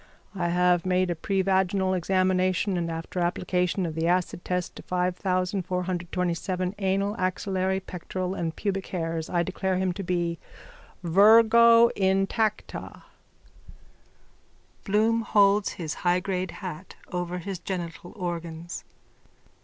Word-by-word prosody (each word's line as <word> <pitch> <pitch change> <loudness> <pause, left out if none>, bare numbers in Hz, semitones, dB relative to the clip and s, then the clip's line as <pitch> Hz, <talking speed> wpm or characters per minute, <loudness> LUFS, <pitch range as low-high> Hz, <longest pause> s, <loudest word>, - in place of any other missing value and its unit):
I 180 -3 -1
have 180 0 +3
made 185 -1 +1
a - - -1
pervaginal 190 +1 +1
examination 185 +1 +1
and, 170 -1 -1
after 165 +2 -5
application 180 +1 0
of 165 - -3
the 160 +1 -1
acid 175 0 0
test 180 -1 -2
to - - -8
5427 180 0 -1
anal, 195 +1 0
axillary, 190 +1 0
pectoral 185 0 -5
and 165 -4 -3
pubic 195 -2 -2
hairs, 165 -2 -3
I 175 -1 +1
declare 190 +1 -2
him 185 -1 0
to 195 - -5
be 175 -2 -1 0.6
virgo 230 +5 +7
intacta. 195 +3 -1 1.8
_(Bloom 220 +3 +2
holds 205 -1 +3
his 160 -4 -4
high 180 0 +3
grade 185 -1 -2 0.2
hat 180 +1 -7 0.2
over 180 -1 -3
his 185 +1 -5
genital 175 0 -5
organs.) 170 -3 -5
185 Hz, 115 wpm, -26 LUFS, 175-195 Hz, 1.8 s, virgo